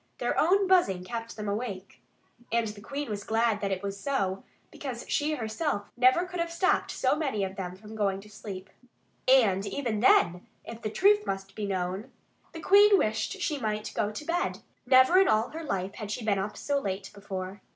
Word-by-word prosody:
Their -, -, -1 dB
own 390 Hz, +5 st, +4 dB
buzzing 350 Hz, -, +3 dB
kept 230 Hz, +3 st, -6 dB
them 210 Hz, -1 st, -5 dB
awake. 200 Hz, -2 st, -5 dB, 0.5 s
And 230 Hz, -1 st, +1 dB
the 210 Hz, -1 st, -10 dB
Queen 280 Hz, +6 st, -5 dB
was 205 Hz, -2 st, -4 dB
glad 225 Hz, -1 st, +1 dB
that 200 Hz, -, -1 dB
it 190 Hz, 0 st, -2 dB
was 200 Hz, 0 st, -4 dB
so, 195 Hz, -7 st, -1 dB, 0.3 s
because 255 Hz, -4 st, -6 dB
she 300 Hz, +1 st, 0 dB
herself 220 Hz, -2 st, -3 dB
never 255 Hz, +8 st, +4 dB
could 360 Hz, -1 st, -6 dB
have 335 Hz, 0 st, -1 dB
stopped 365 Hz, +3 st, +1 dB
so -, -, +1 dB
many 275 Hz, -10 st, -1 dB
of 190 Hz, 0 st, -4 dB
them 185 Hz, -2 st, -5 dB
from 215 Hz, +3 st, -12 dB
going 200 Hz, -3 st, 0 dB
to 210 Hz, -, -15 dB
sleep. 195 Hz, -2 st, -8 dB, 0.6 s
And 220 Hz, -8 st, +5 dB
even 235 Hz, -5 st, -2 dB
then, 180 Hz, -4 st, +4 dB, 0.2 s
if 230 Hz, 0 st, -8 dB
the 215 Hz, -, -2 dB
truth 410 Hz, -, +3 dB
must 195 Hz, 0 st, -4 dB
be 210 Hz, 0 st, -4 dB
known, 185 Hz, +2 st, -3 dB, 0.4 s
the 325 Hz, -, -8 dB
Queen 405 Hz, +3 st, +6 dB
wished 220 Hz, -, 0 dB
that 395 Hz, -3 st, -6 dB
she 300 Hz, -3 st, -1 dB
might 215 Hz, -3 st, -2 dB
go 205 Hz, -, 0 dB
to 215 Hz, +8 st, -7 dB
bed. 345 Hz, +2 st, -1 dB, 0.3 s
Never 260 Hz, +8 st, +6 dB
in 385 Hz, -, +5 dB
all 220 Hz, +3 st, +2 dB
her 325 Hz, +1 st, -7 dB
life 195 Hz, -9 st, -2 dB
had 210 Hz, -2 st, -7 dB
she 215 Hz, +2 st, -4 dB
been 200 Hz, -3 st, +2 dB
up 205 Hz, +2 st, -4 dB
so 285 Hz, -1 st, 0 dB
late 195 Hz, -5 st, -4 dB
before. 195 Hz, -1 st, -6 dB
220 Hz, 205 wpm, -28 LUFS, 195-285 Hz, 0.6 s, Queen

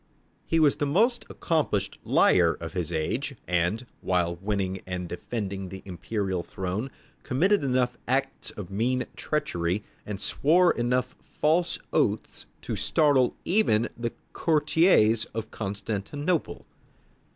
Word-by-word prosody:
He 165 Hz, -, +2 dB
was 150 Hz, -3 st, +4 dB
the 145 Hz, -, 0 dB
most 230 Hz, -, +2 dB
accomplished 125 Hz, -, -1 dB
liar -, -, +4 dB
of 80 Hz, -1 st, -6 dB
his 90 Hz, -3 st, -2 dB
age, 115 Hz, -, -2 dB
and, 90 Hz, +7 st, 0 dB, 0.2 s
while 90 Hz, -2 st, +1 dB
winning 95 Hz, -1 st, -2 dB
and 90 Hz, -1 st, -3 dB
defending 95 Hz, +1 st, -4 dB
the 95 Hz, +1 st, -9 dB
imperial 95 Hz, 0 st, -2 dB
throne, 95 Hz, +8 st, -4 dB, 0.3 s
committed 185 Hz, +8 st, +2 dB
enough 125 Hz, -2 st, +1 dB
acts 135 Hz, +2 st, -1 dB
of 100 Hz, -3 st, -8 dB
mean 125 Hz, +6 st, 0 dB
treachery, 105 Hz, -, -1 dB, 0.2 s
and 105 Hz, -2 st, -5 dB
swore 165 Hz, -, +4 dB
enough 125 Hz, +2 st, 0 dB, 0.2 s
false 165 Hz, +3 st, +2 dB, 0.2 s
oaths -, -, 0 dB, 0.2 s
to -, -, -3 dB
startle 145 Hz, -5 st, +3 dB
even 145 Hz, -, +2 dB
the 115 Hz, 0 st, -3 dB, 0.2 s
courtiers 150 Hz, -, +3 dB
of 110 Hz, -1 st, -4 dB
Constantinople. 110 Hz, -, -3 dB
115 Hz, 120 wpm, -27 LUFS, 95-145 Hz, 0.3 s, was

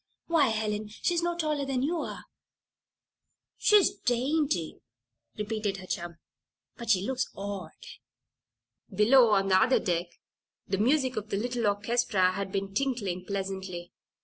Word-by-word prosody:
Why, 325 Hz, -5 st, +3 dB
Helen, 215 Hz, -1 st, -1 dB
she's 335 Hz, +11 st, -1 dB
no 345 Hz, 0 st, -1 dB
taller 305 Hz, -3 st, 0 dB
than 270 Hz, -2 st, -1 dB
you 330 Hz, +4 st, 0 dB
are." -, -, -6 dB, 1.3 s
"She's 420 Hz, -2 st, +5 dB
dainty," 260 Hz, -, 0 dB, 0.6 s
repeated 210 Hz, -2 st, -2 dB
her 185 Hz, -, -9 dB
chum. 170 Hz, -1 st, -4 dB, 0.6 s
"But 235 Hz, -2 st, -8 dB
she 190 Hz, -2 st, +3 dB
looks 260 Hz, +1 st, -1 dB
odd." 195 Hz, -4 st, -5 dB, 1.2 s
Below, 235 Hz, +3 st, +5 dB
on 195 Hz, -2 st, +2 dB
the 185 Hz, -, +5 dB
other 255 Hz, +3 st, +4 dB
deck, 175 Hz, -1 st, -1 dB, 0.6 s
the 195 Hz, 0 st, -1 dB
music 260 Hz, +1 st, +2 dB
of 215 Hz, 0 st, -4 dB
a 200 Hz, -, 0 dB
little 240 Hz, +1 st, -1 dB
orchestra 205 Hz, -2 st, +2 dB
had 195 Hz, +1 st, -4 dB
been 195 Hz, 0 st, -3 dB
tinkling 205 Hz, -7 st, -1 dB
pleasantly. 190 Hz, -3 st, -4 dB
215 Hz, 135 wpm, -28 LUFS, 195-260 Hz, 1.3 s, She's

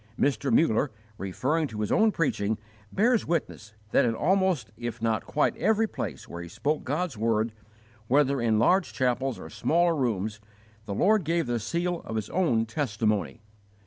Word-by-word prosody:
Mr. 135 Hz, -6 st, +1 dB
Muller, 145 Hz, -2 st, +3 dB, 0.3 s
referring 135 Hz, -, -1 dB
to 110 Hz, -4 st, -6 dB
his 105 Hz, -, -2 dB
own 220 Hz, 0 st, +4 dB
preaching, 110 Hz, -, 0 dB, 0.3 s
bears 235 Hz, +3 st, +2 dB
witness 110 Hz, -10 st, -3 dB, 0.2 s
that -, -, +4 dB
in 115 Hz, -2 st, +1 dB
almost 180 Hz, -, +1 dB
if 120 Hz, 0 st, -5 dB
not 115 Hz, -1 st, -1 dB
quite 150 Hz, -, +1 dB
every 220 Hz, +2 st, +2 dB
place 95 Hz, -, -5 dB
where 85 Hz, -, -7 dB
he 85 Hz, -, -8 dB
spoke 150 Hz, -, -1 dB
God's 150 Hz, 0 st, -2 dB
word, 110 Hz, 0 st, +1 dB, 0.6 s
whether 140 Hz, 0 st, +3 dB
in 110 Hz, -2 st, +2 dB
larger 180 Hz, -, +3 dB
chapels 130 Hz, 0 st, 0 dB
or -, -, -9 dB
smaller 170 Hz, +1 st, +1 dB
rooms, 110 Hz, -6 st, -1 dB, 0.5 s
the 100 Hz, -, -4 dB
Lord 210 Hz, -, +3 dB
gave 165 Hz, +1 st, 0 dB
the 120 Hz, -1 st, -1 dB
seal 170 Hz, +9 st, -2 dB
of 110 Hz, -, -6 dB
His 110 Hz, -2 st, -3 dB
own 125 Hz, -12 st, +2 dB
testimony. 110 Hz, -, -1 dB
125 Hz, 165 wpm, -27 LUFS, 110-165 Hz, 0.6 s, own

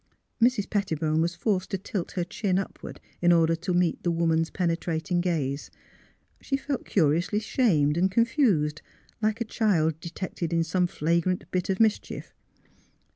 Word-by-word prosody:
Mrs. 235 Hz, -4 st, +3 dB
Petti 195 Hz, -6 st, -1 dB
bone 155 Hz, 0 st, +1 dB
was 170 Hz, +1 st, 0 dB
forced 190 Hz, 0 st, -1 dB
to 195 Hz, -, -1 dB
tilt 190 Hz, -1 st, -4 dB
her 180 Hz, -, -1 dB
chin 185 Hz, +1 st, -1 dB
upward, 195 Hz, -, -5 dB, 0.2 s
in 175 Hz, 0 st, +5 dB
order 165 Hz, -1 st, +4 dB
to 170 Hz, +2 st, -3 dB
meet 175 Hz, -2 st, +1 dB
the 175 Hz, -, 0 dB
woman's 165 Hz, -1 st, +1 dB
penetrating 170 Hz, -1 st, -1 dB
gaze. 150 Hz, -6 st, -2 dB, 0.7 s
She 275 Hz, -, -1 dB
felt 275 Hz, -1 st, -4 dB
curiously 170 Hz, +3 st, +2 dB
shamed 170 Hz, -, +2 dB
and 185 Hz, +2 st, +3 dB
confused, 200 Hz, -, +2 dB, 0.4 s
like 215 Hz, +1 st, 0 dB
a -, -, +1 dB
child 165 Hz, -9 st, +1 dB
de 170 Hz, -, -7 dB
tected 170 Hz, -1 st, -4 dB
in 165 Hz, 0 st, +2 dB
some 180 Hz, +2 st, +1 dB
flagrant 170 Hz, +3 st, 0 dB
bit 180 Hz, 0 st, -1 dB
of 190 Hz, -, 0 dB
mischief. 220 Hz, -2 st, 0 dB
175 Hz, 160 wpm, -27 LUFS, 165-200 Hz, 0.7 s, in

